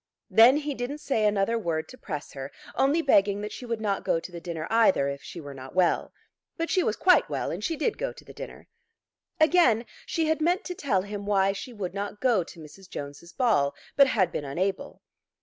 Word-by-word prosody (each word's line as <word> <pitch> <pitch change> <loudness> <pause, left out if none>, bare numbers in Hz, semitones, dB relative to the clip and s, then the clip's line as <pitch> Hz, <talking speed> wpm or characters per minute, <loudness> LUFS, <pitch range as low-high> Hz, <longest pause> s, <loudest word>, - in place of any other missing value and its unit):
Then 235 +5 +7
he 295 -1 -2
didn't 255 +3 -4
say 225 -8 +1
another 210 +3 +1
word 160 -5 -2
to - - -10
press 150 -6 -6
her, 135 0 -7 0.2
only 290 +5 +2
begging 200 -6 +3
that 210 0 -5
she 245 - -8
would 230 -1 -2
not 205 -3 -1
go 165 - +1
to 180 - -9
the 170 -1 -8
dinner 165 -2 -4
either 225 -11 +4
if 140 0 -4
she 175 - -9
were 145 -3 -8
not 130 +2 -10
well. 185 -2 +2 0.5
But 330 +1 -2
she 375 -1 +3
was 220 - 0
quite 365 0 +4
well, - - -2
and - - -5
she 335 -2 -1
did 320 +8 -1
go - - -1
to - - -15
the - - -12
dinner. - - -9 0.7
Again 315 -8 +4 0.2
she 325 - 0
had 315 0 0
meant 355 +5 +1
to 360 - -4
tell 230 - 0
him 205 0 -6
why 195 -1 +3
she 225 +5 -7
would 195 -6 -5
not 205 +1 -4
go 235 -8 +3
to 165 - -13
Mrs. 180 +5 -13
Jones's 145 +4 -8
ball, 190 - +2 0.2
but 280 -1 +7
had 205 -8 +2
been - - -3
unable. 185 +8 -3
205 Hz, 220 wpm, -27 LUFS, 175-270 Hz, 0.7 s, Then